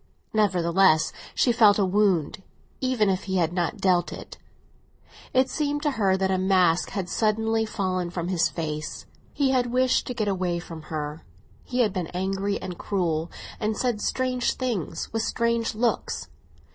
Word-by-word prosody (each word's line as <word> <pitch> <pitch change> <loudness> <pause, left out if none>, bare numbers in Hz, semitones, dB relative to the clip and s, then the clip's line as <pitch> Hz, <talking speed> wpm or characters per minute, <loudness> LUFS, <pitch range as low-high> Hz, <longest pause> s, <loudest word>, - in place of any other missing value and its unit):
Nevertheless, 185 -5 +3 0.2
she 245 - +3
felt 215 -3 +5
a 200 - +3
wound, 190 -4 +1 0.4
even 255 -5 +1
if 190 -1 0
he 190 -1 -2
had 170 -1 +1
not 175 -2 -1
dealt 180 -2 +2
it; - - -9 0.9
it 260 0 +3
seemed 290 +1 -2
to 295 - +2
her 195 -7 +2
that 190 0 0
a 185 - +1
mask 185 -3 +3
had 195 -3 -3
suddenly 220 +2 +1
fallen 185 -4 -2
from 170 -1 -4
his 180 -3 +2
face. 155 -2 -5 0.3
He 275 -2 +1
had 250 -2 +2
wished 255 +1 +2
to 250 - -4
get 215 -3 -1
away 185 -3 0
from 165 -2 -8
her; 150 0 -4 0.4
he 250 0 -1
had 215 -5 +2
been 180 -4 -2
angry 195 +2 -1
and 180 -2 -7
cruel, 170 -4 -1 0.3
and 215 -1 -1
said 240 -5 0
strange 255 0 0
things, 210 - -3
with 225 - 0
strange 235 0 0
looks. 235 +1 -1
195 Hz, 165 wpm, -25 LUFS, 175-230 Hz, 0.9 s, felt